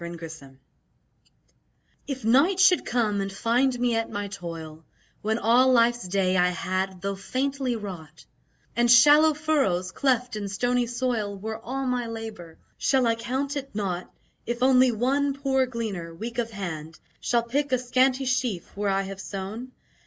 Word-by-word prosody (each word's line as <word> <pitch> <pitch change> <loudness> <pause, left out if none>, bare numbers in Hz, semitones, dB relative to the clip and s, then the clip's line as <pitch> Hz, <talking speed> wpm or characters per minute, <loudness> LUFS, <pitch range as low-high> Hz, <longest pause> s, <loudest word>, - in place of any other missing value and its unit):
In 170 0 -6
Due 165 0 -8
Season 140 -4 -12 1.5
If 265 -5 -5
night 285 - +4
should 365 -1 +5
come 220 -4 +1
and 195 0 -3
find 245 +5 +1
me 245 -1 +1
at 225 0 -1
my 205 0 -4
toil, 165 -4 -8 0.4
When 220 +1 0
all 240 +4 +4
Life's 240 -3 +3
day 185 0 +1
I 180 0 +4
had, 185 +1 -3
tho' 200 0 -1
faintly, 260 +5 -2
wrought, 175 -8 -8 0.5
And 240 0 +2
shallow 295 +6 +7
furrows, 270 - 0
cleft 250 -2 0
in 205 -2 -4
stony 245 +4 0
soil 235 -5 -2
Were 220 +3 -5
all 265 +4 -4
my 250 -2 -1
labour: 220 -8 -8 0.2
Shall 265 -2 +2
I 230 - +3
count 260 +5 -3
it 275 -5 -6
naught 185 -4 -3 0.4
If 240 +1 -2
only 255 -1 +5
one 270 +5 0
poor 265 -2 +1
gleaner, 200 -9 -5
weak 230 +6 -5
of 230 -1 -1
hand, 165 -7 -6 0.2
Shall 235 -1 +1
pick 280 +4 -1
a 255 - +4
scanty 255 +2 +1
sheaf 250 -8 -2
where 205 0 -1
I 195 0 +1
have 195 0 -7
sown? 210 +7 -6
230 Hz, 165 wpm, -26 LUFS, 195-255 Hz, 1.5 s, shallow